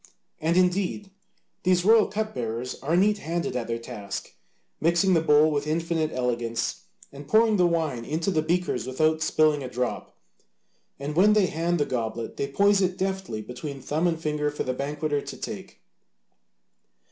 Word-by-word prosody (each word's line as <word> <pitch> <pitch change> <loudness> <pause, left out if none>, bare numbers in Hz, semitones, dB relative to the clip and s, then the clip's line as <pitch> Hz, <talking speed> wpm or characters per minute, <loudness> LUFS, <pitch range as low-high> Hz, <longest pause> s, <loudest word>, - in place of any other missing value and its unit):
And 165 +3 +1
indeed, 190 +2 +1 0.5
these 180 -1 +2
royal 220 0 +6
cup 215 +2 -3
bearers 120 +1 -3
are 160 +5 +1
neat 205 +2 +3
handed 170 -3 -3
at 120 -2 -2
their 115 0 -2
task, 115 -4 -7 0.5
mixing 170 +4 +3
the 165 - +4
bowl 155 0 +5
with 145 0 -1
infinite 160 0 0
elegance, 120 -2 -2 0.3
and 140 +1 -11
pouring 220 +2 +4
the 180 -1 +4
wine 160 -8 -1
into 160 - -1
the 155 - +2
beakers 175 -2 -1
without 155 +4 +1
spilling 155 -2 +3
a 130 - -5
drop, 125 0 -4 0.8
and 145 +2 -5
when 205 +5 +5
they 210 -2 +4
hand 170 +1 0
the 145 - +2
goblet 115 -2 -3
they 140 - -1
poise 200 +7 +3
it 185 -1 0
deftly 190 - -3
between 135 +5 -7
thumb 155 +6 0
and 165 -2 -1
finger 150 -2 -1
for 145 - -4
the 130 - -2
banqueter 145 +2 -2
to - - -8
take. - - -7
155 Hz, 170 wpm, -26 LUFS, 135-180 Hz, 0.8 s, royal